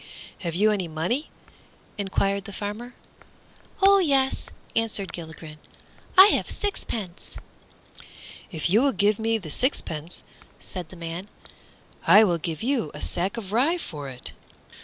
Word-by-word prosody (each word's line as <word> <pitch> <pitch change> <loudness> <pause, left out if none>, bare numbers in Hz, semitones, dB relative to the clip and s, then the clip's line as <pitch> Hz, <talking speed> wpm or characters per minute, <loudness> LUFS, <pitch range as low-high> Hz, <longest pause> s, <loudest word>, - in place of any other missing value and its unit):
"Have 170 -4 -4
you 210 +4 +4
any 195 -4 -1
money?" 170 - -2 0.7
enquired 200 0 0
the 205 - -7
farmer. 210 +5 -6 0.9
"Oh 395 0 +7
yes," 275 -6 +2 0.3
answered 220 -4 0
Gilligren, 160 -2 -9 0.6
"I 380 - +12
have - - +1
a - - -5
sixpence." 220 - -4 1.1
"If 160 -2 -1
you 205 +7 +4
will 275 0 +3
give 205 +1 +2
me 225 0 +1
the 170 -8 -8
sixpence," 165 - -1 0.4
said 180 -4 -5
the - - -12
man, 170 +3 -6 0.8
"I 210 - +9
will 175 -5 +2
give 165 +3 -4
you 245 - 0
a 150 - -8
sack 190 +6 -1
of 200 -4 -6
rye 275 +11 +3
for 145 - -7
it." 125 -1 -8
200 Hz, 140 wpm, -25 LUFS, 170-235 Hz, 1.1 s, I